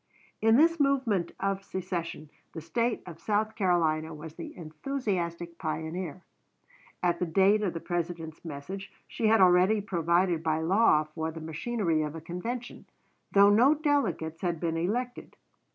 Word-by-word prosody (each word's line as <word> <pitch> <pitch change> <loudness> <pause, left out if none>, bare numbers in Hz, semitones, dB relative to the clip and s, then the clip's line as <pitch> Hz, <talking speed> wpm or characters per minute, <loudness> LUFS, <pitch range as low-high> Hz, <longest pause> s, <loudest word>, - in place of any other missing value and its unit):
In 225 +1 +5
this 330 +4 +4
movement 260 -11 +1
of 195 0 -1
secession 170 -5 -5 0.2
the - - -5
State 230 +9 -1
of 170 -3 -10
South 215 +3 0
Carolina 165 -6 +1
was 155 +1 -9
the 165 - -9
enthusiastic 170 - -3
pioneer. 160 +2 -4 0.8
At 175 -1 +2
the 180 - 0
date 195 +5 +4
of 185 -5 -1
the - - -2
President's 170 -2 -4
message 175 +6 -7 0.2
she 225 - -1
had 225 +1 +5
already 185 +4 +5
provided 175 -3 +1
by 160 -1 0
law 175 -2 +4
for 160 +1 -4
the 160 0 -7
machinery 165 +1 -1
of 150 0 -3
a - - -5
convention, 210 +9 -6 0.5
though 200 0 +6
no 250 +8 +5
delegates 255 - 0
had 175 -3 -1
been 165 -1 -1
elected. 235 +9 -3
175 Hz, 150 wpm, -29 LUFS, 165-215 Hz, 0.8 s, though